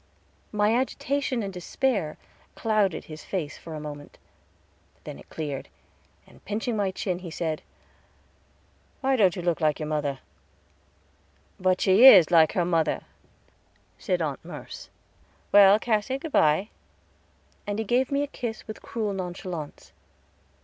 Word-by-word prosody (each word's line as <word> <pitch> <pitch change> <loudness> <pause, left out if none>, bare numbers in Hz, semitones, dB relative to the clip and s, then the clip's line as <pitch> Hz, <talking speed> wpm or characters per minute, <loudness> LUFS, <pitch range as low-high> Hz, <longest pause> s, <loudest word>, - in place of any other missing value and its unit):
My 210 +1 +2
agitation 260 0 -1
and 195 -1 -5
despair 185 - -1 0.4
clouded 210 -6 0
his 155 -1 -10
face 165 -7 -4
for 165 -1 -8
a - - -5
moment, 145 -1 -9 0.9
then - - -8
it - - -16
cleared, 145 -4 -5 0.6
and - - -20
pinching 220 +3 -2
my 200 -2 0
chin, 185 -1 -3
he 180 -2 -8
said, 160 -1 -3 1.4
"Why 270 0 +2
don't 195 -7 +3
you 180 - -5
look 175 -1 0
like 155 -2 +1
your 155 - -3
mother?" 145 -3 -1 1.4
"But 185 0 +1
she 195 +5 +5
is 185 -10 +9
like 160 -2 +5
her 175 - +1
mother," 165 -2 +1 1.0
said - - -1
Aunt - - -4
Merce. - - -9 0.6
"Well, 200 0 +8
Cassy, 220 +3 -1
good 310 +3 -7
by"; 155 - +3 1.0
and 205 0 -2
he 220 - -2
gave 250 +5 +1
me 280 +1 +1
a - - -3
kiss 235 -5 -6
with 215 - -8
cruel 215 -3 -3
nonchalance. 180 -4 -6
190 Hz, 140 wpm, -26 LUFS, 160-220 Hz, 1.4 s, is